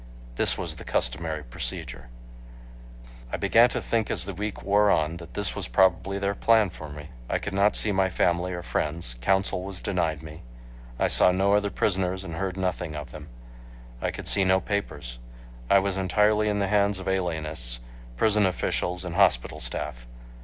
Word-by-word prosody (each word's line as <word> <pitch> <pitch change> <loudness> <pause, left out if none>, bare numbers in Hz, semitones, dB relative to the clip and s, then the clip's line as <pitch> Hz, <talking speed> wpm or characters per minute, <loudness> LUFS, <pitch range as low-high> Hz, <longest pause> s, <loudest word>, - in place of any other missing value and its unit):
This - - +2
was - - -4
the - - -9
customary 75 +5 -2
procedure. - - -6 1.2
I - - -2
began 120 +2 +4
to - - -2
think 115 -3 -1
as - - +1
the 100 - -5
week 105 +2 -5
wore 100 +1 +3
on 80 -2 +1
that 85 0 -12
this 100 -2 0
was - - -3
probably 95 +8 +2
their 100 0 -1
plan 110 -2 +3
for 80 -2 -9
me. 75 +1 -10 0.2
I - - +1
could 100 - -6
not 100 +2 +3
see 105 - +5
my 95 -1 +2
family 90 0 0
or 90 -1 -5
friends; 75 -4 -3
counsel 95 +5 +1
was 95 -1 -4
denied 85 -6 -2
me; 80 +1 -10 0.6
I - - +2
saw - - +5
no 95 +2 +2
other 105 0 +2
prisoners 95 -2 -1
and 85 -4 -7
heard 95 +1 -3
nothing 90 -4 -2
of 75 -4 -7
them; 75 +1 -10 0.7
I - - 0
could - - -6
see 100 - +3
no 95 0 +3
papers; 75 - -4 0.5
I 100 - +6
was 95 0 0
entirely 105 +3 +2
in 105 - 0
the 100 -1 0
hands 100 -1 +2
of 95 0 -7
alienists, 80 -10 +1 0.4
prison 105 - +3
officials 90 0 -2
and 90 - -5
hospital 90 -10 +2
staff. - - -3
95 Hz, 180 wpm, -26 LUFS, 80-100 Hz, 1.2 s, I